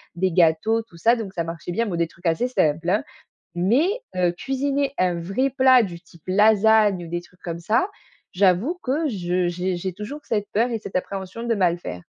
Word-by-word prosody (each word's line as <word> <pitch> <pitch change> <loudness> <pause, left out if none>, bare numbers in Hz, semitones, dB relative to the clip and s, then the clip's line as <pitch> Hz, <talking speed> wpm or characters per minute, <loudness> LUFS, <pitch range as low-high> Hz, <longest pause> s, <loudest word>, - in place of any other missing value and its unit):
des 185 +1 0
gâteaux 175 +7 +3
tout 170 -7 -18
ça 230 +7 +4
donc 205 -5 -6
ça 170 - -2
marchait 165 +1 -6
bien, 230 +3 0
bon 180 - -2
des 170 -1 +1
trucs 170 +1 -7
assez 165 +10 +1
simples, 165 -5 +1
hein 210 - +1 0.5
mais, 230 - +2 0.3
heu, 180 -1 +2
cuisiner 275 +6 -1
un 180 -2 +1
vrai 205 +11 0
plat 260 -2 +5
du 175 -4 -5
type 170 -2 -20
lasagnes 210 -1 +4
ou - - -10
des 175 0 -2
trucs 180 +1 -22
comme 170 -1 -5
ça. 230 - +1 0.4
J'avoue 200 - +2
que 295 +5 0
je 180 -4 -1
j'ai 180 +1 -2
j'ai 185 +1 -4
toujours 210 +10 -7
cette 210 -3 -2
peur 235 +4 +2
et 225 - -1
cette 190 - -5
appréhension 190 +4 -4
de 235 -1 +1
mal 175 -4 +1
faire. 90 - -7
190 Hz, 205 wpm, -23 LUFS, 175-230 Hz, 0.5 s, plat